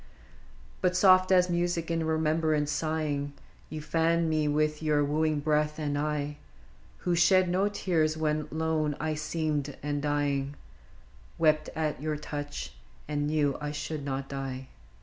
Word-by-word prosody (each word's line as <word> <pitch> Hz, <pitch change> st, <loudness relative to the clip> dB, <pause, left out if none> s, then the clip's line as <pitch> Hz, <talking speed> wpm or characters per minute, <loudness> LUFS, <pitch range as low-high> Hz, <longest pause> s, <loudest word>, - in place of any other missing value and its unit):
But 180 Hz, 0 st, +2 dB
soft 185 Hz, 0 st, +6 dB
as 180 Hz, -1 st, +5 dB
music 175 Hz, -1 st, -1 dB
in 165 Hz, -1 st, 0 dB
remembrance 155 Hz, -1 st, +1 dB
sighing, 150 Hz, -2 st, -1 dB, 0.4 s
You 155 Hz, -1 st, -5 dB
fanned 165 Hz, +1 st, +1 dB
me 155 Hz, -1 st, +1 dB
with 150 Hz, +1 st, +1 dB
your 150 Hz, -2 st, +2 dB
wooing 155 Hz, 0 st, +1 dB
breath, 150 Hz, 0 st, +1 dB
and 145 Hz, -2 st, -2 dB
I, 150 Hz, 0 st, -2 dB, 0.7 s
Who 175 Hz, -, +2 dB
shed 185 Hz, +2 st, +5 dB
no 190 Hz, +3 st, +2 dB
tears 160 Hz, -6 st, 0 dB
when 155 Hz, -1 st, 0 dB
lone 155 Hz, -2 st, 0 dB
I 155 Hz, 0 st, -1 dB
seemed 150 Hz, -2 st, -2 dB
and 145 Hz, -1 st, -1 dB
dying, 145 Hz, -1 st, 0 dB, 0.8 s
Wept 155 Hz, -1 st, +3 dB
at 155 Hz, -3 st, -1 dB
your 155 Hz, 0 st, -1 dB
touch, 145 Hz, -1 st, -5 dB, 0.3 s
and 145 Hz, -1 st, -1 dB
knew 150 Hz, -3 st, +1 dB
I 150 Hz, -, -2 dB
should 150 Hz, 0 st, -4 dB
not 135 Hz, -1 st, -3 dB
die. 135 Hz, -1 st, -5 dB
155 Hz, 145 wpm, -29 LUFS, 145-160 Hz, 0.8 s, soft